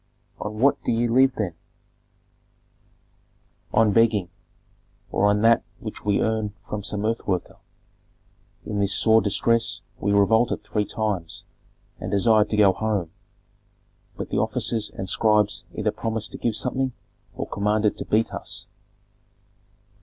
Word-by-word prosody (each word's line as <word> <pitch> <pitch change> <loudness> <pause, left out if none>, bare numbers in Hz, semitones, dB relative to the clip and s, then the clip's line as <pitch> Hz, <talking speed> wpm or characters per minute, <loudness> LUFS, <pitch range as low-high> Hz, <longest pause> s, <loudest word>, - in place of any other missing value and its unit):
"On 105 +1 -5
what 135 +5 +3
do - - 0
ye 120 +1 +1
live 130 +3 +4
then?" 100 -6 -2 2.2
"On 110 -2 +3
begging, 110 -5 +3 0.8
or 100 - +2
on 105 0 +2
that 115 0 +5 0.2
which - - -8
we 100 -1 +2
earn 110 -2 0
from 105 - -4
some 105 +1 -3
earth 115 +1 -2
worker. 90 -3 -2 1.1
In 105 -1 -3
this 100 0 +2
sore 110 0 +4
distress 115 +3 +1 0.2
we 100 - 0
revolted 110 +4 +3
three 105 -1 -1
times, 100 -6 -2 0.6
and 90 - -5
desired 105 +2 +3
to 105 - -1
go 100 -3 +6
home. 100 -6 -2 1.1
But - - -5
the - - +1
officers 110 -2 -1
and 95 - -6
scribes 105 +1 +2
either - - 0
promised 110 -1 -4
to - - -8
give 115 -3 0
something 130 +2 -1 0.4
or - - -3
commanded 105 +1 +1
to - - -4
beat 110 +1 +1
us." - - -5
105 Hz, 140 wpm, -24 LUFS, 100-115 Hz, 2.2 s, go